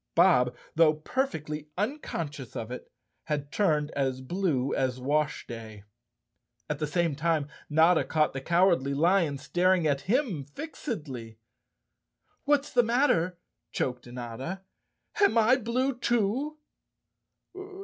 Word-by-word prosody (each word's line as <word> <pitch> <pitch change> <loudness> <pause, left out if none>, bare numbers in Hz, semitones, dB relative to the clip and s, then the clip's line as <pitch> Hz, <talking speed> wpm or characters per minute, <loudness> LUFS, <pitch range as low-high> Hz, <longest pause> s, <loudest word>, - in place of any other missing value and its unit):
Bob, 125 0 +5 0.2
though 155 -1 +5
perfectly 155 - -3
unconscious 165 - -4
of 115 +1 -5
it, 125 - -8 0.3
had 145 -2 -3
turned 155 -7 +1
as 135 -2 -1
blue 140 -2 -1
as 130 -1 0
washday. 120 -7 -2 0.8
At 150 -1 -3
the 150 - -1
same 165 -1 0
time 155 -1 0 0.2
Notta 160 +3 +5
caught 155 -1 +1
the 135 - -4
Cowardly 170 -4 +2
Lion 165 -1 +3
staring 175 +5 +2
at 140 -2 +1
him 230 - +1
fixedly. 145 - -6 1.1
"What's 290 0 +2
the 245 - +6
matter?" 225 - +2 0.3
choked 125 -1 -2
Notta. 125 +9 -6 0.6
"Am 400 - +5
I 230 +3 +5
blue, 255 +3 0
too?" 240 +5 0
155 Hz, 115 wpm, -28 LUFS, 135-200 Hz, 1.1 s, the